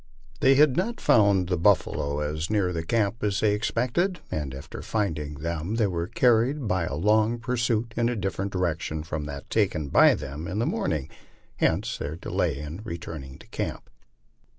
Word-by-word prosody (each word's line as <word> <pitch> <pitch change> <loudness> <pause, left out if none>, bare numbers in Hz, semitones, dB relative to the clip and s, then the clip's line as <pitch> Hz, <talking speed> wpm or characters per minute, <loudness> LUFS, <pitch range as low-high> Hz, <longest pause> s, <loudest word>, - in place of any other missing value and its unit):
They 135 +1 +5
had 145 -2 +5
not 230 +8 -1
found 100 -4 +4
the 90 -2 0
buffalo 70 -3 +2
as 75 +2 -2
near 100 -4 +1
camp 110 +4 0
as 100 -2 +1
they 110 - +3
had - - +2
expected, 130 - 0
and 75 -3 -2
after 65 +1 -8
finding 80 -9 -2
them 85 +6 -3
were 90 -7 0
car 125 - +4
ried 135 +1 -2
by 90 -3 +1
a 70 - -3
long 110 +7 +3
pursuit 115 -1 -1
in 120 0 +2
a 120 - -1
different 95 -1 -2
direction 85 -4 -2
from 75 -1 -4
that 70 -1 -8
taken 85 -9 +1
by - - +6
them 75 +5 -6
in 95 - -4
the 115 - +1
morning. 75 - -1 0.5
Hence - - 0
their 75 - -4
delay 85 - -1
in 75 +6 -6
returning 80 -7 -7
to - - -16
camp. - - -5
95 Hz, 175 wpm, -26 LUFS, 80-115 Hz, 0.5 s, by